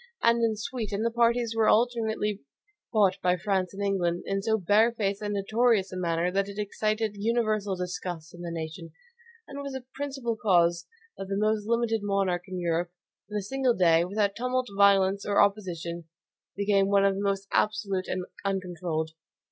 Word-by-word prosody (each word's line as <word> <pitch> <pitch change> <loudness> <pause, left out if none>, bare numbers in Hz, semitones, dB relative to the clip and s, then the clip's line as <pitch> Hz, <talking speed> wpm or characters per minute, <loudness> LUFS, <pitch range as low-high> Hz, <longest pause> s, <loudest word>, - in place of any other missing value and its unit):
And 235 0 +4
in 225 -1 +2
Sweden 215 -1 -3
the 230 - +1
parties 235 0 +2
were 220 -1 +3
alternately 220 -3 +1 0.5
bought 200 -3 +3
by 180 0 +2
France 185 -1 -1
and 200 +1 -5
England 180 -3 0
in 195 0 -1
so 220 +2 +1
barefaced 205 +1 +2
and 205 -1 -2
notorious 215 0 +2
a - - -4
manner 170 -1 0
that 195 +1 0
it 200 - -9
excited 215 +1 -1
universal 215 -3 0
disgust 180 -2 -5
in 175 - -11
the 175 - -5
nation, 165 0 -6 0.5
and 280 0 -7
was 280 -1 -6
a 260 -1 -6
principal 270 -5 -3
cause 175 -5 +2 0.3
that 195 - -5
the 195 0 -2
most 215 0 0
limited 230 -1 +1
monarch 195 -3 0
in 185 -1 -5
Europe, 170 0 -1 0.4
in 210 - -3
a 205 - -2
single 260 +2 +1
day, 170 -2 +4
without 200 +2 0
tumult, 250 +1 -1
violence, 195 0 +4
or 205 - +1
opposition, 175 -5 0 0.5
became 200 -1 +2
one 200 0 +4
of 195 - +3
the 195 - -4
most 200 -1 -1
absolute 200 -3 0
and 185 0 -3 0.2
uncontrolled. 175 -5 -2
200 Hz, 170 wpm, -27 LUFS, 185-220 Hz, 0.5 s, And